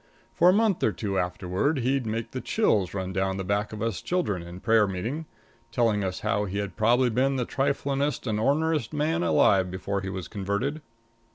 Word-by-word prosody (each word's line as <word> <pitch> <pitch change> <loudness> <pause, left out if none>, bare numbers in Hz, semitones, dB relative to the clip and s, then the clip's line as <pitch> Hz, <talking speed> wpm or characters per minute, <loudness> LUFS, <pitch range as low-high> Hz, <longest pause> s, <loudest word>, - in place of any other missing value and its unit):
For 175 - +5
a - - +6
month 210 -3 +2
or 110 - +3
two 100 0 -2
afterward, 90 - -1
he'd 130 -1 0
make 115 +1 -3
the 130 - -4
chills 105 - +1
run 95 -1 -3
down 95 +1 0
the 95 - -3
backs 100 +3 -1
of 110 0 -5
us 115 -5 -2
children 170 - -1
in 85 +1 -9
prayer 110 0 +3
meeting, 115 - -4 0.4
telling 115 -4 +2
how 95 +2 -1
he 100 0 -4
had 100 -1 -3
probably 120 +3 +3
been 135 +4 +2
the 125 -2 -1
triflingest 140 +2 -1
and 110 -3 -1
orneriest 150 +1 +1
man 155 +3 0
alive 95 - +3
before 95 +2 -3
he 95 - -4
was 95 -2 -5
converted. 105 +10 -2
110 Hz, 190 wpm, -26 LUFS, 95-140 Hz, 0.4 s, a